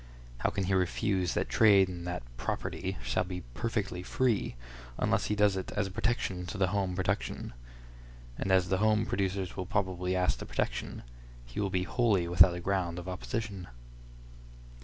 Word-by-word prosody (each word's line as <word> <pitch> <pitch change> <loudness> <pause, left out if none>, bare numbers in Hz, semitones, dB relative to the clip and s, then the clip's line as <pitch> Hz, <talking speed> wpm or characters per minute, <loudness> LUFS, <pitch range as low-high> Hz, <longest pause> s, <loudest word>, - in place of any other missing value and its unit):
How - - +2
can 100 - -2
he 95 +1 0
refuse 95 0 +1
that - - 0
trade 100 -4 +6
in 90 -2 -6
that 90 -5 -3
"property" 60 - -3
shall - - +1
be 90 0 -5
"perfectly 105 - -2
free," 115 - 0 0.4
unless - - +1
he 105 - 0
does 105 -1 +4
it 95 - -4
as 105 - 0
a 95 - -5
protection 95 -4 -1
to 105 - -5
the 95 -2 +2
home 95 -2 0
production? 90 -10 -2 0.8
And 95 - -2
as 95 -1 +4
the 95 0 +2
home 110 +1 +3
producers 95 -4 -1
will 90 -2 -4
probably 95 -2 0
ask 90 0 +1
the - - -7
protection, - - -3 0.4
he - - -7
will 100 -2 +1
be 90 -1 0
wholly 105 -5 +2
without 85 0 +6
a - - -4
ground 90 -2 -1
of 90 +1 -6
opposition. 95 +1 -4
95 Hz, 175 wpm, -31 LUFS, 90-105 Hz, 0.8 s, trade